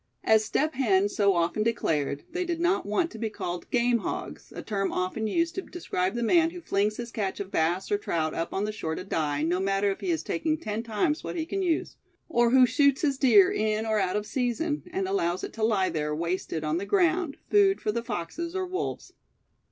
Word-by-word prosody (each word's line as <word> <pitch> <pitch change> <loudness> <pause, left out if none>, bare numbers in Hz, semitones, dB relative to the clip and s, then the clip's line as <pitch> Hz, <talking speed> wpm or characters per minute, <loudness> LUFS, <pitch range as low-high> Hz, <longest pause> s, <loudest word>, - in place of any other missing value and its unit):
As 220 0 +4
Step 305 +8 0
Hen 205 -7 +2
so 200 -2 +2
often 170 +4 +1
declared, 150 -10 0
they 360 +2 -1
did 340 -2 -2
not 350 - +1
want 270 +12 0
to 220 - -9
be 225 -1 -1
called 175 -4 -5
"game 240 -1 +2
hogs," - - -6
a - - -7
term 195 -2 -1
often 185 +4 -2
used 335 +8 0
to 380 - -3
describe 195 - -3
the 240 - -1
man 330 +7 +4
who 355 +1 -9
flings 210 -9 0
his 235 -1 -6
catch 200 -3 -3
of 195 -1 -5
bass 170 - 0
or 410 - +2
trout 160 - -1
up 165 - -3
on 195 - -1
the 215 - -2
shore 160 -7 -4
to 185 - -5
die, 150 -6 -1
no 175 +3 +1
matter 195 +1 +1
if 195 - -5
he 375 - -2
is 330 -2 0
taking 315 -1 -1
ten 215 -5 -3
times 235 +8 -1
what - - -5
he 320 -2 -2
can 390 +3 -3
use; 345 -4 -1 0.3
or 240 -6 +3
who 255 +1 +7
shoots 275 +4 +2
his 275 -3 +1
deer 215 -8 +6
in 215 +1 0
or 220 -1 +1
out 185 -2 0
of 210 0 -1
season, 265 +6 -1
and 380 +1 -1
allows 185 - 0
it - - -5
to 225 - -7
lie 205 -4 +2
there, 150 -1 -2
wasted, 170 -1 -2
on 155 +1 0
the 190 - -3
ground, 350 -5 +2
food 395 -1 +5
for 210 - -1
the 235 +2 -2
foxes 230 - -5
or 380 -1 -1
wolves. 370 +1 -4
220 Hz, 230 wpm, -27 LUFS, -, 0.3 s, who